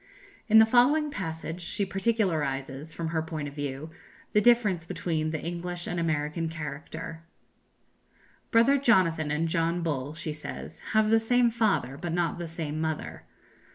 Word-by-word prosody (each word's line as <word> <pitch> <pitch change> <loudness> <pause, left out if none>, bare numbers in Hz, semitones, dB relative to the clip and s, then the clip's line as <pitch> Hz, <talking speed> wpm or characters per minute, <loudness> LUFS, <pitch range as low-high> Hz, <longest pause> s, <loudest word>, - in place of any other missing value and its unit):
In 220 -1 +6
the 220 - +9
following 290 +6 +4
passage 165 - -5
she 200 +4 -2
particularizes, 160 - -1
from 165 +1 -4
her 160 -1 0
point 155 -2 -4
of 140 - -8
view, 145 +1 -5 0.4
the 210 - +5
difference 215 -7 +4
between 155 -3 -1
the 160 0 -2
English 175 +1 -4
and 175 - -2
American 160 0 -1
character: 160 +1 -6 1.3
"Brother 245 +5 +5
Jonathan 180 - +3
and 155 +3 0
John 165 +1 0
Bull," 145 -2 -2
she 155 -1 -3
says, 150 - -8
"have 215 0 +4
the 225 - +6
same 240 +1 +3
father, 205 - 0
but 175 -2 -3
not 175 0 0
the 170 - -4
same 155 -2 -4
mother. 160 -1 -4
165 Hz, 155 wpm, -28 LUFS, 155-210 Hz, 1.3 s, the